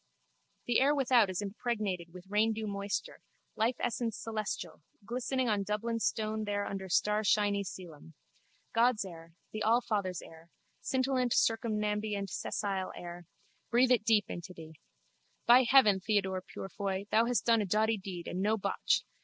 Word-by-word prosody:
The 240 - +3
air 285 +3 +4
without 250 -6 +4
is 185 +2 -2
impregnated 200 -5 -3
with 180 +1 -11
raindew 215 +2 +1
moisture, 200 0 -4 0.3
life 230 +3 +1
essence 230 -2 -2
celestial, 215 -7 -4 0.2
glistening 255 +2 -1
on 210 -3 +1
Dublin 215 +3 -2
stone 215 -1 -1
there 205 0 -1
under 195 -1 -5
starshiny 210 +1 +2
coelum. 165 -4 -9 0.6
God's 230 -2 +3
air, 165 -2 -11 0.2
the 215 - -5
Allfather's 210 -6 +1
air, 165 +1 -14 0.3
scintillant 260 -2 0
circumambient 210 -3 0
cessile 195 -2 -2
air. 175 -1 -9 0.4
Breathe 245 +3 +4
it 240 -4 +4
deep 215 -2 +3
into 180 +1 -7
thee. 160 -1 -10 0.7
By 245 +2 +7
heaven, 215 -8 +6
Theodore 190 -2 0
Purefoy, 195 +1 -4
thou 225 +1 +4
hast 245 -1 0
done 230 -2 +4
a - - -1
doughty 220 +3 +2
deed 185 -3 -7
and 185 - -3
no 215 +2 +2
botch! - - 0
210 Hz, 145 wpm, -31 LUFS, 190-230 Hz, 0.7 s, By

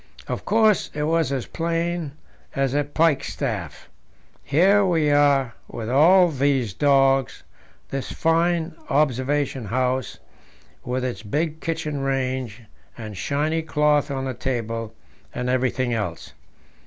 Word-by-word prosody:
"Of - - -4
course, 220 -1 +3
it 150 - -1
was 160 -2 +1
as 130 -4 -2
plain 170 -2 -2 0.4
as 135 -2 0
a 145 +1 +2
pikestaff. 150 0 -1 0.6
Here 190 +8 +4
we 165 -5 +2
are 140 -4 +3
with 115 0 -5
all 175 +6 +6
these 135 - 0
dogs, 135 -1 +2 0.5
this 135 -1 -4
fine 165 0 +1 0.2
'observation 135 -2 0
house,' 130 +2 -1 0.7
with 125 +1 -2
its 125 -3 -4
big 150 +9 -2
kitchen 155 -4 -3
range 130 -4 -2 0.3
and 110 -3 -7
shiny 150 - -1
cloth 150 -2 +1
on 135 -1 -3
the 130 - -3
table, 115 -3 -4 0.4
and 125 - -2
everything 130 -1 0
else. 100 -7 -4
140 Hz, 120 wpm, -23 LUFS, 130-160 Hz, 0.7 s, all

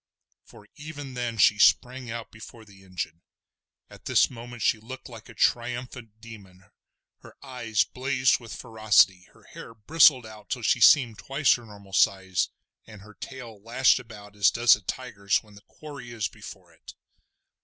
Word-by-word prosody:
for 105 - -18
even 145 -3 -9
then 120 -2 -4
she 105 0 +4
sprang 125 +3 +2
out 115 0 -7
before 110 +1 -13
the 100 -2 -18
engine. 85 -3 -6 0.7
At - - -17
this - - +3
moment 120 -1 -9
she 110 - +2
looked 130 +4 -10
like 115 -1 -13
a 120 - -13
triumphant 120 -1 -2
demon. 100 -5 -15 0.5
Her - - -16
eyes 125 -5 -1
blazed 130 -1 0
with 115 -3 -10
ferocity, 105 -4 +2
her - - -22
hair 115 - -12
bristled 130 +2 +4
out 110 -2 -13
till 125 -3 -4
she - - +1
seemed 120 -7 +5
twice 135 +1 +2
her 120 -2 -6
normal 100 -2 -15
size, 95 -1 +1 0.4
and 105 -3 -13
her 105 +1 -15
tail 115 -1 -10
lashed 125 +5 +2
about 105 -4 -13
as 100 -2 +4
does 120 0 +4
a 105 - -13
tiger's 100 -2 -2
when 105 -1 -20
the 100 - -15
quarry 140 -5 -11
is 110 -5 -2
before - - -13
it. - - -15
115 Hz, 165 wpm, -26 LUFS, 105-125 Hz, 0.7 s, seemed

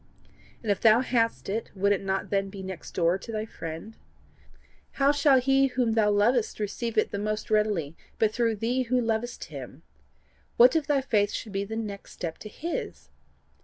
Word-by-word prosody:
And 215 - +1
if 200 - -1
thou 225 +1 +6
hadst 235 -3 0
it, 215 +4 -3
would 200 +1 +2
it 200 - +1
not 195 0 -2
then 195 -1 +1
be 195 -1 -8
next 190 -2 -8
door 175 +1 +2
to 230 - -8
thy 215 -1 -2
friend? 165 +1 -7 1.0
How 275 0 +3
shall 285 -2 +4
he 270 +1 +3
whom 250 -3 0
thou 220 -2 +3
lovest 215 +3 +2
receive 220 +2 -3
it 215 - +2
the 200 - -3
most 215 +1 -3
readily 205 -8 +1 0.2
but 215 -1 +2
through 230 -1 +1
thee 235 +5 0
who 255 0 +3
lovest 230 +1 -2
him? - - -9 0.7
What 250 +5 +7
if 310 -3 +1
thy 285 -3 +2
faith 210 -6 +2
should 215 - -5
be 195 0 -2
the 220 +2 -6
next 210 -3 -6
step 165 -2 -5
to 215 - -8
his? 335 +10 -5
220 Hz, 190 wpm, -27 LUFS, 200-245 Hz, 1.0 s, What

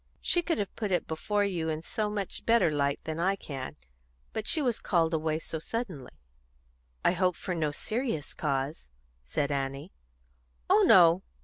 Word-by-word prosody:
She 350 - +2
could 335 -1 -1
have 200 -2 -3
put 210 -3 -3
it 180 - +1
before 205 +6 0
you 170 -5 -1
in 155 0 -3
so 215 +3 -2
much 205 -2 -4
better 225 -8 +4
light 140 -1 0
than 160 0 -4
I 190 +3 +2
can. 135 -8 -6 0.6
But 215 - -3
she 325 - +4
was 245 -6 +1
called 165 -3 +1
away 155 -1 0
so 160 0 -5
suddenly." 185 - -5 0.9
"I - - +6
hope 180 0 +1
for 185 - -4
no 160 -3 0
serious 220 - -3
cause," 140 - -2 0.3
said 140 - -2
Annie. 135 0 -3 0.8
"Oh - - +5
no! 175 0 +7
170 Hz, 170 wpm, -29 LUFS, 150-205 Hz, 0.9 s, no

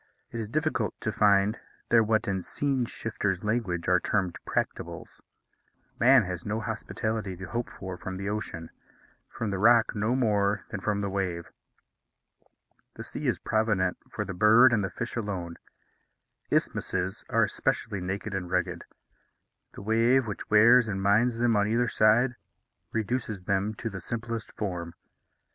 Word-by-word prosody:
It 115 - -5
is 110 -2 -4
difficult 155 -5 -1
to 110 - -1
find 105 +1 +3 0.3
there 115 - +6
what, 110 0 +1
in 95 -2 -1
scene 135 +5 -1
shifters' 105 -5 -3
language, 105 -6 -1
are 90 0 +4
termed 95 -2 -1
practicables. - - -4 0.8
Man 130 0 +6
has 90 -2 -5
no 105 +2 -2
hospitality 110 -3 -3
to 95 - -7
hope 120 +5 -3
for 95 -1 -7
from 95 +1 -5
the 100 +1 -5
ocean; 95 -6 -4 0.6
from 115 -3 -4
the 95 - -2
rock 115 +2 +5
no 110 +4 0
more 105 -4 +1
than 105 - -3
from 100 +1 -1
the 100 - -2
wave. 90 -3 -3 1.4
The - - -7
sea - - -5
is - - +1
provident 105 -4 +1
for - - -4
the 95 - -5
bird 110 +6 +6
and 105 -3 +2
the 95 - -1
fish 120 +5 -5
alone. 95 -7 -4 0.9
Isthmuses 95 +2 -1
are - - +3
especially 100 - -1
naked 100 +3 -4
and 90 -2 -3
rugged; 90 0 -1 0.9
the - - -9
wave, 115 +4 +3
which 105 -3 -6
wears 115 +3 +6
and 100 -2 -2
mines 110 +5 +3
them 120 -1 +2
on 100 0 +2
either 120 +3 +1
side, 120 +3 +3 0.5
reduces 110 -3 -2
them 100 +2 0
to 115 - -5
the 95 -4 -5
simplest 115 +2 -4
form. 90 -5 -4
105 Hz, 155 wpm, -28 LUFS, 95-115 Hz, 1.4 s, there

